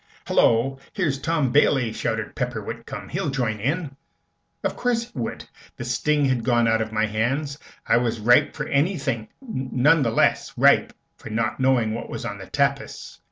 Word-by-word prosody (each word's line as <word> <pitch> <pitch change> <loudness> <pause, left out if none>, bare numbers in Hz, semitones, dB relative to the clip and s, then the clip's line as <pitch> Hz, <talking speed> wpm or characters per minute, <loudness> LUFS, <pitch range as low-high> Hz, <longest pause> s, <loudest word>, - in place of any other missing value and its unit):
"Hullo! 130 +4 +2
Here's 155 -8 0
Tom 155 -4 0
Bailey!" 135 -5 +3
shouted 110 -1 -3
Pepper 125 -3 -2
Whitcomb. 115 +5 -7
"He'll 170 -2 -2
join 120 -5 -1
in!" 140 - -2 0.7
Of - - -1
course 245 -2 0
he 135 - -8
would. 115 - -4 0.3
The 120 - -6
sting 145 +4 +1
had 130 -3 +1
gone 120 -2 +3
out 115 0 +2
of 110 0 -3
my 110 0 +1
hands, 135 +7 -1 0.3
and - - +4
I - - -1
was 115 -1 -1
ripe 120 +3 +4
for 150 - -3
anything 140 - 0
none 145 - +1
the 120 - +2
less 115 - +1
ripe - - +4 0.2
for - - -10
not 110 +3 -1
knowing 130 -4 +2
what 115 - -5
was - - -5
on - - -5
the - - -9
tapis. - - -2
125 Hz, 180 wpm, -23 LUFS, 115-145 Hz, 0.7 s, and